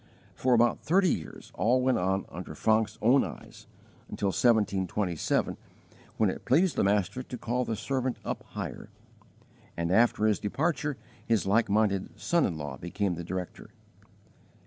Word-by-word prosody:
For 125 Hz, -1 st, +2 dB
about 120 Hz, +1 st, +3 dB
thirty 185 Hz, +2 st, +3 dB
years 80 Hz, -, -8 dB
all 125 Hz, +3 st, +2 dB
went 130 Hz, 0 st, +2 dB
on 95 Hz, +2 st, 0 dB
under 85 Hz, -2 st, -8 dB
Francke's 110 Hz, +3 st, +1 dB
own 125 Hz, +5 st, +5 dB
eyes, -, -, -9 dB, 0.4 s
until 100 Hz, -, -1 dB
1727, 100 Hz, -5 st, +1 dB, 0.6 s
when 105 Hz, -4 st, +3 dB
it -, -, -8 dB
pleased 165 Hz, +6 st, +3 dB
the -, -, +2 dB
Master 100 Hz, +4 st, +1 dB
to 130 Hz, -1 st, -7 dB
call 125 Hz, +2 st, -1 dB
the 115 Hz, -, -2 dB
servant 130 Hz, +2 st, -2 dB
up -, -, -3 dB
higher; -, -, -7 dB, 0.9 s
and 85 Hz, 0 st, -1 dB
after 110 Hz, +1 st, +3 dB
his 110 Hz, -2 st, +2 dB
departure 150 Hz, -, -1 dB, 0.3 s
his 115 Hz, -2 st, +1 dB
like 105 Hz, +2 st, +2 dB
minded 100 Hz, -2 st, 0 dB
son 170 Hz, -1 st, +2 dB
in 85 Hz, -, -4 dB
law 75 Hz, -3 st, -6 dB
became 95 Hz, +5 st, -2 dB
the 85 Hz, 0 st, -5 dB
director. 90 Hz, +1 st, -6 dB
110 Hz, 150 wpm, -28 LUFS, 95-125 Hz, 0.9 s, own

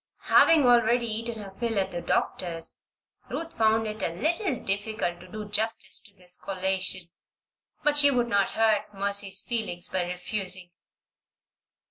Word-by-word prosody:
Having 315 Hz, -4 st, +7 dB
already 240 Hz, 0 st, +4 dB
eaten 225 Hz, 0 st, -3 dB
her 195 Hz, -, -9 dB
fill 230 Hz, -2 st, -1 dB
at 190 Hz, 0 st, -1 dB
the 175 Hz, -, -4 dB
doctor's, 165 Hz, -2 st, -1 dB, 0.5 s
Ruth 330 Hz, 0 st, -5 dB
found 220 Hz, 0 st, +3 dB
it 215 Hz, 0 st, -4 dB
a -, -, +1 dB
little 315 Hz, -, 0 dB
difficult 200 Hz, -3 st, -2 dB
to 180 Hz, -, -13 dB
do 210 Hz, +3 st, -7 dB
justice 220 Hz, +2 st, 0 dB
to 200 Hz, -, -17 dB
this 180 Hz, -1 st, -4 dB
collation; 190 Hz, -1 st, 0 dB, 0.8 s
but 295 Hz, -1 st, +3 dB
she 285 Hz, -1 st, +7 dB
would 245 Hz, -3 st, +1 dB
not 200 Hz, -4 st, +2 dB
hurt 215 Hz, -2 st, +2 dB
Mercy's 200 Hz, +1 st, +1 dB
feelings 215 Hz, -7 st, -3 dB
by 185 Hz, -, 0 dB
refusing. 180 Hz, 0 st, -4 dB
210 Hz, 145 wpm, -27 LUFS, 190-230 Hz, 0.8 s, Having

